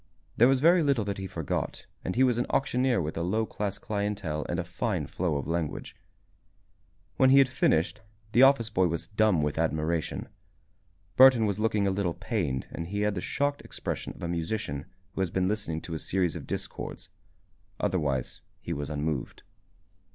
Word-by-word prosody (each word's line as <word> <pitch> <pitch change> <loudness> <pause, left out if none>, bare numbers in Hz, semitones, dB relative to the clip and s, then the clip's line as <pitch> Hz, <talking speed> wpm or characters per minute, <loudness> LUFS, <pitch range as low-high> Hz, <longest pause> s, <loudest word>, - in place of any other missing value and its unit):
There 120 - +6
was 135 0 +3
very 170 +3 +6
little 140 -8 +2
that 100 -1 -3
he 95 - -4
forgot 85 -6 -3 0.2
and 90 - -3
he 130 - +4
was 125 -2 +3
an 120 - 0
auctioneer 130 -3 +2
with 80 -2 -3
a - - -1
low 110 +6 0
class 100 -2 -3
clientele 100 -8 -3
and 85 - -1
a 90 - -1
fine 90 - -2
flow 85 +1 -1
of 70 - -2
language. 85 -2 -3 1.2
When 130 - +5
he 135 - +7
had 135 -1 +7
finished, 105 - +1 0.3
the 120 - +4
office 135 -5 +5
boy 95 -1 +3
was 85 -1 -3
dumb 105 -6 +3
with 75 +1 -1
admiration. 80 0 -1 0.9
Burton 130 -4 +8
was 100 -1 -1
looking 110 -2 +1
a 100 - +2
little 95 -3 -1
pained 95 - -2
and 85 - -5
he 100 +3 -2
had 105 0 +1
the 90 - -3
shocked 145 +6 -1
expression - - -5
of - - -11
a - - -1
musician 85 -4 -3 0.3
who - - -2
has 95 - +1
been 90 +2 0
listening 100 -6 -2
to 85 - -7
a 80 - -3
series 90 -2 0
of - - -7
discords. - - -5 0.7
Otherwise 75 -10 -1 0.2
he 85 - -4
was 70 -2 -4
unmoved. 75 -3 -3
95 Hz, 185 wpm, -28 LUFS, 80-110 Hz, 1.2 s, Burton